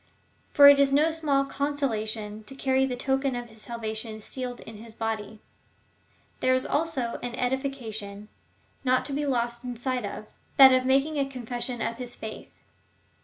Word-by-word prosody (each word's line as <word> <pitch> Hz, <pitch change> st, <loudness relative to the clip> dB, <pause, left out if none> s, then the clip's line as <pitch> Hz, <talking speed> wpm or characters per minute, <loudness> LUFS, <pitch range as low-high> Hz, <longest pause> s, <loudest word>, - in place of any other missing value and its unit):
For 285 Hz, -1 st, +9 dB
it 285 Hz, 0 st, +8 dB
is 280 Hz, -1 st, +4 dB
no 300 Hz, +4 st, +4 dB
small 290 Hz, -4 st, +1 dB
consolation 220 Hz, -7 st, -2 dB
to 270 Hz, -, -9 dB
carry 265 Hz, 0 st, +2 dB
the 250 Hz, -, -3 dB
token 265 Hz, +1 st, 0 dB
of 240 Hz, -1 st, -5 dB
his 220 Hz, -1 st, -11 dB
salvation 220 Hz, -1 st, -5 dB
sealed 250 Hz, +3 st, -6 dB
in 220 Hz, -, -10 dB
his 220 Hz, +1 st, -12 dB
body. 220 Hz, -1 st, -4 dB, 1.0 s
There 255 Hz, 0 st, +3 dB
is 255 Hz, -, 0 dB
also 285 Hz, -7 st, -1 dB
an 245 Hz, -1 st, -4 dB
edification, 240 Hz, -6 st, -3 dB, 0.6 s
not 255 Hz, -1 st, +2 dB
to 280 Hz, -, -4 dB
be 290 Hz, +1 st, -1 dB
lost 240 Hz, -2 st, -1 dB, 0.2 s
sight 255 Hz, 0 st, -2 dB
of 200 Hz, +1 st, -6 dB, 0.2 s
— -, -, -36 dB
that 265 Hz, -1 st, +10 dB
of 255 Hz, 0 st, +2 dB
making 275 Hz, +4 st, +2 dB
a 275 Hz, -1 st, 0 dB
confession 245 Hz, -1 st, -4 dB
of 230 Hz, -, -2 dB
his 245 Hz, -1 st, -6 dB
faith. 220 Hz, 0 st, -8 dB
250 Hz, 170 wpm, -27 LUFS, 225-275 Hz, 1.0 s, that